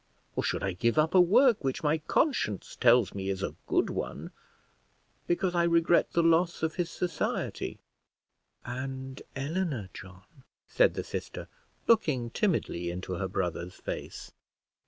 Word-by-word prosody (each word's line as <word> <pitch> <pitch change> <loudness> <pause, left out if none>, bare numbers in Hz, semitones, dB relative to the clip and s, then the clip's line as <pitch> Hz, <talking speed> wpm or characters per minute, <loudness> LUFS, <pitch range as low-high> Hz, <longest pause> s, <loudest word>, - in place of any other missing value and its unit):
or - - 0
should - - -1
I 95 - 0
give 115 +8 0
up 155 +1 +3
a 185 - +8
work 230 - +5
which 135 +3 -2
my 155 +1 +2
conscience 155 - 0
tells 120 -5 +4
me 95 -1 -4
is 95 0 -2
a - - -2
good - - +1
one, - - -5 1.0
because 175 +1 +1
I 175 - +2
regret 170 0 +3
the 170 - +3
loss 165 +1 +2
of 160 0 0
his 175 -2 -2
society?" 180 -1 -3 0.9
"And 130 +1 -5
Eleanor, 140 - -2
John?" 90 0 -11 0.4
said - - +3
the - - -2
sister, - - -6 0.4
looking 145 - +2
timidly 135 - 0
into 90 +1 -5
her 95 +1 -2
brother's 90 0 -3
face. - - -7
135 Hz, 145 wpm, -29 LUFS, -, 1.0 s, a